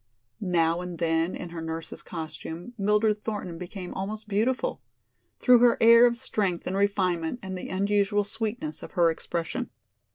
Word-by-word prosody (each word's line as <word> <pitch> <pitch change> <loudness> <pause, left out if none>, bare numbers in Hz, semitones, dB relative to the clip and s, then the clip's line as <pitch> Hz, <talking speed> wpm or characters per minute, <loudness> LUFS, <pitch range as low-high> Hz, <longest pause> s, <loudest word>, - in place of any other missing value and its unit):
Now 170 -4 +1
and 180 -1 -6
then 165 +1 +1
in 175 - -6
her 170 -1 -6
nurse's 160 0 -5
costume 165 +5 -7
Mildred 210 0 +2
Thornton 190 -6 -4
became 180 0 -7
almost 215 +3 -4
beautiful, 245 - 0 0.6
through 250 -2 +6
her 240 0 +5
air 230 +1 +8
of 235 0 -1
strength 205 -8 -1
and 185 - -2
refinement 190 -3 +1
and 190 0 -5
the 180 - -6
unusual 205 +2 +1
sweetness 225 +8 -3
of - - -10
her 170 -3 +4
expression. 170 +9 -4
195 Hz, 155 wpm, -27 LUFS, 170-220 Hz, 0.6 s, air